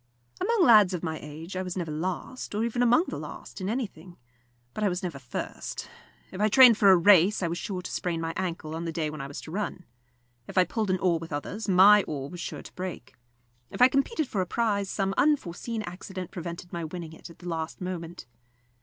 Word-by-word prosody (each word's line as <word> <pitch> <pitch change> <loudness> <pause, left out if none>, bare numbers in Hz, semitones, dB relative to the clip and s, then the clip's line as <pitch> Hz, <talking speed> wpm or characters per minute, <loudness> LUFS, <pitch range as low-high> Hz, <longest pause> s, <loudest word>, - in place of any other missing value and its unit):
Among 460 -5 +3
lads 210 - +7
of 175 - -6
my 160 -2 -3
age 155 +5 -8
I 185 - -1
was 185 0 -5
never 170 -4 -3
last, 185 +9 -4
or 215 - 0
even 235 +1 -1
among 245 +7 +5
the - - -5
last, - - -9
in 185 - -2
anything; 190 -8 -5 0.6
but 215 - -3
I 205 - +3
was 180 +2 -3
never 165 -6 -4
first. 130 -2 -6 0.4
If 190 - -5
I 210 - +4
trained 245 -1 +8
for 200 - +6
a 190 - +8
race, 190 +2 +5
I - - +2
was 170 +1 -3
sure 185 -3 -4
to - - -6
sprain 170 -2 -2
my 165 0 -3
ankle 170 -4 -3
on 165 +1 -4
the 165 - -2
day 160 -2 -2
when 155 -2 -6
I 135 - -5
was 140 - -7
to 155 - -10
run. 190 -1 -4 0.6
If - - -9
I 185 - +7
pulled 210 +3 -2
an 185 - +2
oar 175 -2 +1
with 165 0 -9
others, 200 +9 -4
my 200 +3 +8
oar 140 -2 -5
was 175 - -8
sure - - -6
to - - -12
break. 180 -8 -6 0.6
If - - -8
I 250 +1 +8
competed 275 - 0
for 200 - -1
a 180 - -2
prize, 205 -2 0
some 195 -1 -1
unforseen 230 - 0
accident 185 0 -7
prevented 170 0 -7
my 170 -1 -3
winning 160 0 -6
it 160 - -12
at 170 - -14
the 180 - -10
last 160 -1 -4
moment. 175 -5 -6
180 Hz, 230 wpm, -27 LUFS, 165-210 Hz, 0.6 s, trained